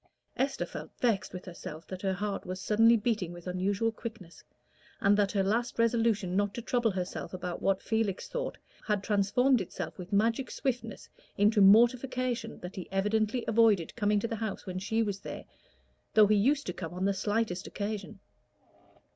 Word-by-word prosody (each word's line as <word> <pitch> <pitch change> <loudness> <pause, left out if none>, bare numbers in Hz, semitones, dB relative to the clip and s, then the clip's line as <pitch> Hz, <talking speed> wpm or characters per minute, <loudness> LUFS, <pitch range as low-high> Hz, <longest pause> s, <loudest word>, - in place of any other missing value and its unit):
Esther 270 +1 -1
felt - - -8
vexed 230 -6 +1
with 180 0 -8
herself 165 -3 -8
that 185 -1 -7
her 190 -1 0
heart 200 +1 -3
was 185 +1 -5
suddenly 225 +4 +5
beating 210 -6 -1
with 175 -1 -10
unusual 195 +5 0
quickness, 220 -6 -9 0.6
and 200 0 +4
that 205 -1 +2
her 195 -2 +2
last 230 +5 0
resolution 230 -5 +2
not 205 0 +1
to 235 - -4
trouble 240 -1 +1
herself 185 -1 -4
about 180 -1 -5
what 195 -1 +1
Felix 220 -4 -1
thought - - -4 0.3
had 210 -3 0
transformed 220 +5 +3
itself 175 -2 -6
with 180 0 -8
magic 230 +5 +1
swiftness 235 -5 -3 0.3
into 210 +1 +4
mortification 240 +3 +4
that 180 +1 -7
he 185 - -7
evidently 215 +4 0
avoided 220 -6 +3
coming 210 -2 +2
to 230 - -2
the 225 - -4
house 220 -2 -4
when 185 -1 -4
she 220 +4 0
was 200 -2 -3
there, - - -7 0.7
though 215 -1 +8
he 210 +1 +3
used 275 +8 +2
to 180 - -3
come 170 -1 -6
on 185 +1 -1
the 200 - +2
slightest 205 -1 -1
occasion. 205 -1 -5
210 Hz, 175 wpm, -30 LUFS, 190-230 Hz, 0.7 s, though